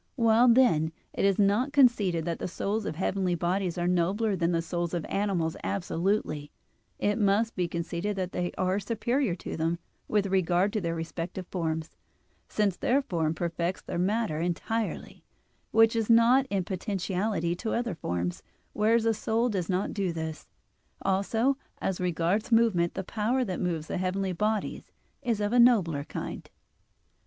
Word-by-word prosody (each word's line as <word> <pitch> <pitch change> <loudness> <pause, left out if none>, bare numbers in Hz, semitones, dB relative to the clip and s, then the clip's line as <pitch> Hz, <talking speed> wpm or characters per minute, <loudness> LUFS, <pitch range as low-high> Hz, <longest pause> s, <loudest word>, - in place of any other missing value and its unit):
While, 230 0 +4
then, 230 -11 +4 0.2
it - - 0
is 195 -1 +3
not 210 +8 +2
conceded 210 - +3
that 170 -1 -2
the - - -3
souls 200 +4 -2
of - - -3
heavenly 190 +1 0
bodies 180 +1 -1
are 175 0 0
nobler 190 +5 +1
than 170 -1 +1
the 170 - +1
souls 175 0 -2
of 170 - -2
animals 190 -5 -1
absolutely 175 -5 -1 0.5
it 205 +2 0
must 210 +2 +2
be 180 -1 0
conceded 170 +4 -3
that 185 -2 -3
they 175 0 -2
are 185 +1 +1
superior 230 +1 0
to - - -6
them 165 +1 0 0.3
with 210 -2 +1
regard 185 0 +2
to 215 - 0
their 170 -1 -2
respective 165 +3 -5
forms, 160 -3 -3 0.5
since 200 -4 0
their 275 +3 +2
form 165 - -1
perfects 170 +2 -2
their - - -4
matter 195 -3 0
entirely, 195 +6 -3 0.5
which 225 +1 +4
is 225 -1 0
not 235 +4 +5
in 195 -2 0
potentiality 190 -1 -2
to 220 +3 -3
other 235 -3 -1
forms; 90 - -3 0.3
whereas 225 +2 +2
a 225 - +3
soul 225 +3 0
does 185 -6 -2
not 185 +1 0
do 195 -3 -1
this. 160 -1 -5 0.6
Also 220 +7 +1 0.2
as 185 -1 -2
regards 180 +5 0
movement 220 -7 +3
the 190 - -3
power 230 +7 0
that 185 -4 -3
moves 165 -4 -1
the 175 - -3
heavenly 185 +1 -1
bodies 210 +4 -2 0.3
is 235 -5 0
of 205 +2 -1
a 245 - +4
nobler 190 -12 +4
kind. - - -6
190 Hz, 165 wpm, -28 LUFS, 170-220 Hz, 0.6 s, not